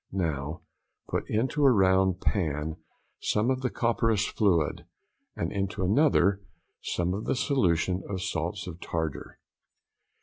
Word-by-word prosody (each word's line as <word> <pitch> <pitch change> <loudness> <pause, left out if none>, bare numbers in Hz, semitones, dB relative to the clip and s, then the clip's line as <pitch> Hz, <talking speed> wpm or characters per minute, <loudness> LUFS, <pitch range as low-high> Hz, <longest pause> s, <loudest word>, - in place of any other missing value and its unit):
Now 80 -3 -2 0.5
put - - -2
into 130 +7 0
a 140 - +8
round 95 -4 +3
pan 80 -4 -1 0.4
some 110 +5 +1
of 130 0 -1
the 130 - 0
copperas 115 -3 +1
fluid, 85 -8 +1 0.5
and 85 - -2
into 100 -1 -2
another 100 - +3 0.4
some 90 +1 -1
of 100 +3 -4
the - - 0
solution 95 - +1
of 95 -2 -3
salts 95 +1 -3
of 90 -2 -8
tartar. 80 -8 -4
95 Hz, 130 wpm, -28 LUFS, 85-110 Hz, 0.5 s, a